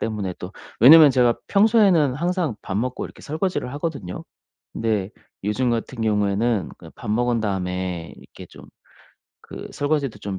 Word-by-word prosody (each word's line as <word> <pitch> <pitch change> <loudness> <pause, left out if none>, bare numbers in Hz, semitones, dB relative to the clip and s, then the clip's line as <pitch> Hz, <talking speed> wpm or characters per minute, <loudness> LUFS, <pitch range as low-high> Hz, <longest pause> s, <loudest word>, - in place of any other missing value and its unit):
때문에 105 -5 -3
또 90 +2 -8 0.3
왜냐면 150 +3 +9
제가 125 -2 +2
평소에는 200 - +4
항상 170 - -1
밥 95 - -4
먹고 125 +4 -2
이렇게 - - -16
설거지를 155 -3 -3
하거든요. 145 - -5 0.5
근데 105 -4 -1 0.3
요즘 120 +5 0
같은 115 +1 -3
경우에는 105 -1 0
그냥 - - -14
밥 - - -6
먹은 120 +1 +1
다음에 90 -4 -3
이렇게 - - -14
좀 - - -15 0.8
그 - - -8
설거지도 145 -6 -1
좀 100 -2 -5
120 Hz, 330 characters per minute, -22 LUFS, 100-145 Hz, 0.8 s, 왜냐면